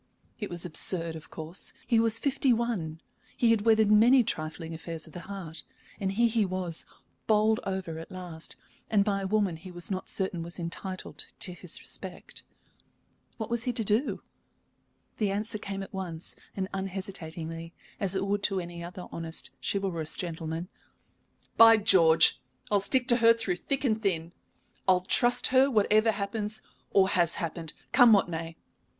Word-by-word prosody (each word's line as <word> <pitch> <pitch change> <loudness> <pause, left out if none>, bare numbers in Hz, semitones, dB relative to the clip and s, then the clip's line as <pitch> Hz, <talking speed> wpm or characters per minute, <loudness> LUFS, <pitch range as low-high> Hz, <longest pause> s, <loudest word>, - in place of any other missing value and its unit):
It 210 - -4
was 175 0 -2
absurd, 165 0 +2
of 155 - -11
course. 160 +3 -4
He 235 -2 +3
was 225 0 +5
fifty 275 0 +1
one, 220 -10 -1 0.4
he 235 -2 +4
had 225 -2 +3
weathered 220 -1 +4
many 240 +5 +6
trifling 160 -4 -4
affairs 165 0 -6
of 160 - -15
the - - -7
heart, 170 -5 -6 0.4
and 195 -1 -1
here 235 +4 +3
he 225 -1 +1
was, 185 -3 +1 0.4
bowled 215 0 +3
over 190 -4 -4
at 165 - -9
last, 175 -3 -6 0.3
and 200 -2 +3
by 200 -2 0
a 195 - -2
woman 200 -4 +1
he 175 +4 -11
was 175 +1 -4
not 185 -1 -3
certain 190 -3 +1
was 170 +1 -2
entitled 185 +2 -6
to 180 - -2
his 175 -1 -5
respect. - - -7 1.0
What 220 0 -5
was 235 -1 +1
he 250 - 0
to 230 -1 -1
do? 215 +7 0 1.0
The 210 -3 +1
answer 210 +2 -2
came 195 -1 -5
at - - -12
once 175 -4 -5 0.2
and 190 -1 -2
unhesitatingly, 170 -4 -5 0.3
as 195 -1 -2
it 190 +1 0
would 200 +1 0
to 195 -2 0
any 170 -1 -7
other 180 +1 -8
honest, 165 0 -5
chivalrous 180 -6 0
gentleman. 165 0 -4 0.9
"By 225 0 +9
George, 170 -6 +5 0.3
I'll 205 - +4
stick 250 +6 +1
to 240 - +6
her 230 -1 +6
through 205 -6 -2
thick 275 +8 -2
and 220 -3 +1
thin! 170 -4 -1 0.5
I'll 185 -1 +4
trust 240 +6 +3
her 265 +1 +6
whatever 215 -1 +3
happens 210 +1 -3 0.3
or 195 -1 +4
has 175 -4 +2
happened, 165 -3 -4 0.2
come 245 -4 +7
what 200 - +4
may. 165 -1 -6
190 Hz, 170 wpm, -28 LUFS, 170-220 Hz, 1.0 s, By